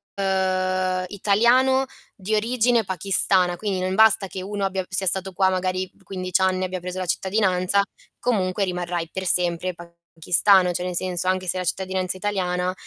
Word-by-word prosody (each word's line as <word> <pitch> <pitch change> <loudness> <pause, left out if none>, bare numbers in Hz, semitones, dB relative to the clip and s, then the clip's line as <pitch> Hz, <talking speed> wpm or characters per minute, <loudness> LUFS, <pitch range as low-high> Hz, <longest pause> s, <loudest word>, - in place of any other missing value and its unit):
ehm, 185 -1 0
italiano 240 +7 +3 0.3
di 200 +3 -4
origine 235 0 +2
pakistana, 185 -1 +1
quindi 195 -1 -2
non 185 0 -1
basta 220 -2 +5
che 185 0 -7
uno 200 +1 -4
abbia 190 -1 -2
sia 190 0 -1
stato 190 +1 0
qua 190 +1 +3
magari 185 0 -2
15 185 0 -2
anni 185 0 +1
e - - +1
abbia 185 0 -4
preso 180 +1 -6
la 185 - -2
cittadinanza, 190 +1 +1 0.4
comunque 195 -4 0
rimarrai 175 -2 -3
per 190 0 -5
sempre 180 0 0
pakistano, 170 +2 +1
cioè 180 +1 -3
nel 180 -1 -3
senso 185 0 0
anche 185 0 0
se 185 - 0
la 180 - -3
cittadinanza 185 0 -2
è - - -8
italiana, 185 -2 -1
185 Hz, 170 wpm, -23 LUFS, 180-195 Hz, 0.4 s, basta